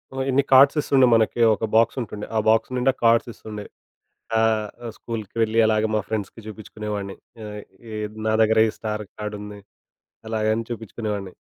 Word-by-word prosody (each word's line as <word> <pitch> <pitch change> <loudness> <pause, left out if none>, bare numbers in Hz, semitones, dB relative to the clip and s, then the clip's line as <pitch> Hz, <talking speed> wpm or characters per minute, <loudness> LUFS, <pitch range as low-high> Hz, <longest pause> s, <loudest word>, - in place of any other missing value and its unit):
ఆ - - -4
ఇన్ని 135 +1 +3
కార్డ్స్ 135 +3 +7
ఇస్తుండే 135 -3 +4
మనకి 115 +1 +1
ఒక 110 - -3
బాక్సుంటుండే. 115 -2 +1
ఆ - - +3
బాక్స్ 110 +3 +3
నిండా 130 +2 +2
కార్డ్స్ 115 +1 +4
ఇస్తుండే. 105 -2 -8 0.7
ఆహ్, 110 -1 +2 0.2
ఆ - - -3
స్కూలుకి 110 -4 -7
వెళ్ళి 110 0 +2
అలాగే 110 0 +2
మా 105 - +1
ఫ్రెండ్స్‌కి 110 +1 -5
జూపించుకునేవాడిని. 105 -2 -6 0.3
ఆహ్, 105 0 -7 0.3
ఏ - - -6 0.3
నా 110 - +2
దగ్గర 110 0 +4
ఈ - - -4
స్టార్ 105 -1 -3
కార్డుంది. 105 -1 -6 0.7
అలాగ 110 -1 0
అన్ని 115 0 -3
చూపించుకునేవాడిని. 105 -4 -5
110 Hz, 155 wpm, -23 LUFS, 105-115 Hz, 0.7 s, కార్డ్స్